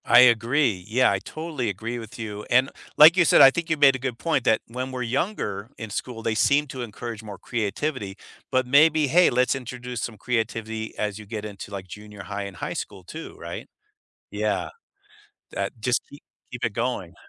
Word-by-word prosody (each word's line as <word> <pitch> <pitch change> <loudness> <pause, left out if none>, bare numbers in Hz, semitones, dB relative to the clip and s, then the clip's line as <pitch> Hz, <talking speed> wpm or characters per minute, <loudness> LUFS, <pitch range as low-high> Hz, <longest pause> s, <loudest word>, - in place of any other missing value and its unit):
I 120 - +7
agree. 120 -3 +3
Yeah, 125 +4 +3
I 100 - 0
totally 155 - -4
agree 115 +5 -4
with 115 0 -10
you 105 -2 -6
and 130 +2 +4 0.3
like 160 +3 +9
you 180 - +5
said, - - +6
I 135 - +10
think 170 +3 -3
you 160 - +1
made 140 -2 +6
a - - -4
good 125 -2 -3
point 140 -3 0
that 110 -2 +3
when 130 +3 -5
we're 125 -1 -3
younger 115 - -2
in 110 -3 -7
school, 115 +1 -5
they 110 - 0
seem 140 +7 +3
to 130 -2 -6
encourage 115 0 -6
more 105 -3 -9
creativity, 115 -1 -3 0.3
but 130 -1 +2
maybe, 150 +3 +5
hey, 175 +7 +5
let's 125 +1 +2
introduce 125 -2 -6
some 115 -3 -5
creativity 110 -1 -3
as 105 0 -2
you 105 - -10
get 105 0 -5
into, 100 -1 -8
like, 95 -2 -6
junior 105 +1 -10
high 100 0 -4
and 100 -3 -8
high - - -4
school 95 -3 -6
too, 160 - -9
right? - - -7 0.6
Yeah. - - -1 0.8
That - - -2
just 120 +2 +1
keep 145 - -13 0.3
keep 125 - -4
it 115 - 0
going. 115 -7 -2
120 Hz, 200 wpm, -25 LUFS, 105-130 Hz, 0.8 s, I